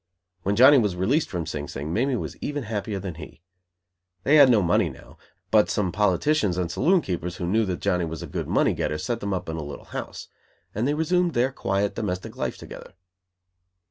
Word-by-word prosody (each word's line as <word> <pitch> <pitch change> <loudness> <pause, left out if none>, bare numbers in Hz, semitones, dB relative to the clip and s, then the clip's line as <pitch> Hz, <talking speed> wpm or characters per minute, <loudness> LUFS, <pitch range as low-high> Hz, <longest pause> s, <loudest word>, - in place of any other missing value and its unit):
When 100 +4 0
Johnny 130 +5 +8
was 105 -6 0
released 120 - +1
from 85 -3 -3
Sing 75 -2 -5
Sing, 75 +4 -5
Mamie 130 +6 +1
was - - -4
even 145 -1 -4
happier 105 -2 -3
than 95 -2 -5
he. 80 +2 -12 0.8
They 150 +3 +5
had 140 -3 +8
no 110 -5 +4
money 85 - +2
now, - - -15 0.3
but 105 -1 +4
some 95 -4 0
politicians 105 - +1
and 90 -2 -1
saloon 170 - +3
keepers 90 - -4
who 90 - -4
knew 110 +5 +2
that 90 -2 -3
Johnny 90 -1 +1
was 80 -1 -6
a - - -4
good - - -4
money - - +2
getter, 75 - -2
set 115 +10 -3
them 100 -2 -3
up 90 -2 -3
in 80 0 -4
a 80 - -4
little 70 0 -8
house. - - -7 0.5
And 110 +5 -1
they 145 - +1
resumed 175 +2 +1
their 125 +3 +2
quiet 100 -4 -1
domestic 95 -4 -4
life - - -3
together. - - -11
100 Hz, 205 wpm, -25 LUFS, 90-130 Hz, 0.8 s, Johnny